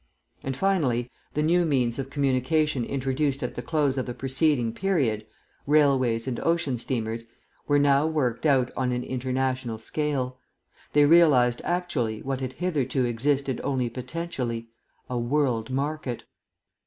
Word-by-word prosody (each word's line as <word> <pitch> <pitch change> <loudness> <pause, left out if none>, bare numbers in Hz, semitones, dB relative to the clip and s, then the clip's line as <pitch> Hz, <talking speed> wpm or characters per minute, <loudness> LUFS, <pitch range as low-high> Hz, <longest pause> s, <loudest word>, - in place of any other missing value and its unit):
And, 135 -1 -4
finally, 135 -11 +1 0.2
the 150 - +1
new 175 +3 +3
means 130 -6 +1
of 135 0 -4
communication 140 0 +1
introduced 135 +2 -1
at 125 - -3
the - - -5
close 145 -2 0
of 130 - -3
the 120 - -4
preceding 135 -2 +1
period 125 - 0 0.4
railways 135 -6 +3
and 125 -2 -2
ocean 165 -7 0
steamers 115 -2 -3 0.4
were 145 - +4
now 145 +1 +4
worked 150 -4 0
out 130 -4 +3
on 130 -1 0
an 125 0 -1
international 130 -2 -2
scale; 130 +1 -2 0.5
they 145 0 +6
realised 145 -7 +5
actually, 150 -12 -1
what 135 0 -3
had 130 -1 -3
hitherto 140 -7 0
existed 135 +2 0
only 130 -4 -1
potentially, 125 -3 -4 0.4
a 125 -1 -2
world 120 -2 0
market. 140 -1 -3
130 Hz, 140 wpm, -26 LUFS, 125-150 Hz, 0.5 s, they